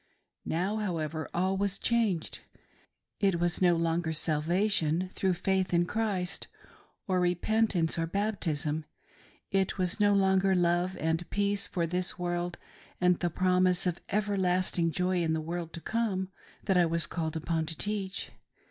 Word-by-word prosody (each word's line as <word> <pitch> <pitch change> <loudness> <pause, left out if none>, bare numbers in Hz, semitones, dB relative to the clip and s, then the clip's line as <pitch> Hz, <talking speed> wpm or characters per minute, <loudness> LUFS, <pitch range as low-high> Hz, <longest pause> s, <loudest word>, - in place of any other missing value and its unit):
Now, 190 +6 0
however, 160 -6 -3
all 185 +2 0
this - - -4
was - - -2
changed. 220 -8 0 0.8
It 195 -4 +2
was 175 +1 0
no 175 -2 +5
longer 165 0 0
sal 155 -1 0
vation 180 0 +1
through 190 -2 0
faith 185 0 0
in 170 0 +3
Christ, 195 -3 -2 0.6
or 185 -2 +2
repentance, 180 -1 +1
or 165 - 0
baptism; 160 -6 -1 0.7
it 195 0 +1
was 185 +1 0
no 205 -1 +4
longer 190 0 +3
love 175 +1 +1
and 160 +2 -1
peace 205 +1 +2
for 170 -3 -1
this 180 +2 -2
world 175 0 -2 0.4
and 180 -1 +3
the 175 - 0
promise 185 +1 +2
of 175 -1 -1
everlasting 185 -4 +1
joy 180 +1 0
in 160 -1 +1
rthe 160 -1 -1
world 170 0 -4
to 165 - -7
come, 200 -4 -1 0.3
that 190 -3 +2
I 175 -1 +5
was 165 -1 +2
called 160 0 -3
upon 160 0 -1
to 165 -1 -4
teach. 200 -2 -3
180 Hz, 155 wpm, -30 LUFS, 165-195 Hz, 0.8 s, no